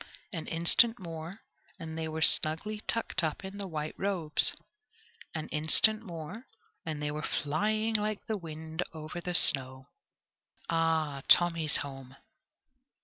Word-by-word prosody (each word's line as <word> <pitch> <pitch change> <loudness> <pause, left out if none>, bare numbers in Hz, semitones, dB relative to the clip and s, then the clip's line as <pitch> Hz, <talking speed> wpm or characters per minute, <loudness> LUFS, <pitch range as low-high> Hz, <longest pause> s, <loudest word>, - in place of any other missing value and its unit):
An 165 -4 -4
instant 200 +8 +4
more, 170 +1 -8 0.4
and 160 -3 -7
they 160 0 -3
were 160 0 -2
snugly 205 +10 +2
tucked 225 -5 0
up 160 +4 -2
in 195 +1 -8
the 200 - -4
white 155 -3 -4
robes 180 -6 0 0.8
an 155 - -4
instant 160 +8 +5
more, 180 - -8 0.4
and 155 -2 -4
they 150 0 -2
were 150 +1 -4
flying 215 +11 -1
like 210 -1 0
the 220 - -2
wind 160 -2 -6
over 160 +2 -7
the 180 0 -1
snow. 130 -5 +5 0.9
Ah! 160 -4 0
Tommy's 165 -3 +4
home. 135 -1 -10
165 Hz, 135 wpm, -30 LUFS, 155-195 Hz, 0.9 s, instant